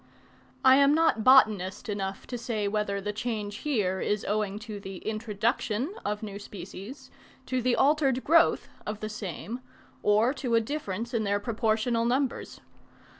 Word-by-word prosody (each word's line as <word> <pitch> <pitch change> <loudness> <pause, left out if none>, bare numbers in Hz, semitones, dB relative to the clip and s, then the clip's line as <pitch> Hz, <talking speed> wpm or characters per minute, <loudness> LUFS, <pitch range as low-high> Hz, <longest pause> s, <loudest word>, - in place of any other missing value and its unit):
I 260 0 +8
am 280 +1 +5
not 320 -9 +2
botanist 220 -5 +4
enough 195 -2 -4
to 250 - -6
say 220 -3 -2
whether 200 -1 -1
the 210 +1 -3
change 210 -2 -3
here 210 -10 0
is 210 +1 -1
owing 210 -1 -1
to 215 -3 -6
the 195 -1 -8
introduction 220 - -1
of 210 +1 -3
new 200 -1 -6
species, 200 +5 -9 0.3
to 255 -1 -1
the 250 0 +2
altered 275 -2 +2
growth 335 +2 +4 0.2
of 210 0 -4
the 215 - -4
same, 215 +3 -6 0.4
or 215 +5 +3
to 255 -4 -1
a - - +6
difference 230 -3 -4
in 225 -2 +1
their 200 0 +1
proportional 225 +1 0
numbers. 255 +2 -1
220 Hz, 155 wpm, -28 LUFS, 205-250 Hz, 0.4 s, I